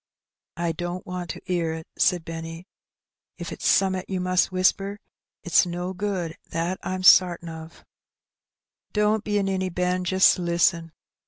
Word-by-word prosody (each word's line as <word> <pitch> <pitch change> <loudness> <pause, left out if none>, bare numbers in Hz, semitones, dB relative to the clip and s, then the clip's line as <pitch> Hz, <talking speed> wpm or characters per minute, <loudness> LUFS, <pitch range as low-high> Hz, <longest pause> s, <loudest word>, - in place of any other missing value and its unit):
''I 170 -1 -1
don't 175 +2 -5
want 180 -1 -5
to - - -6
'ear 170 -3 -1
it," 160 0 -8
said 175 -3 +2
Benny, 165 +1 -7 0.7
"if - - -6
it's - - -3
some'at 190 -1 +2
you 190 -1 -2
must 185 +1 +1
whisper. 195 +2 +1 0.5
It's 175 +1 +3
no 175 +2 -4
good, 185 -4 -3
that 170 +3 -2
I'm 185 0 -4
sartin 175 -2 +5
of." 160 0 -11 0.6
" - - -58
Don't 210 0 +2
be 210 -1 -1
a 200 - +1
ninny, 190 -1 -1
Ben. 180 +1 -1
Just 190 +1 +4
listen." 170 -1 +1
180 Hz, 155 wpm, -24 LUFS, 170-190 Hz, 0.7 s, sartin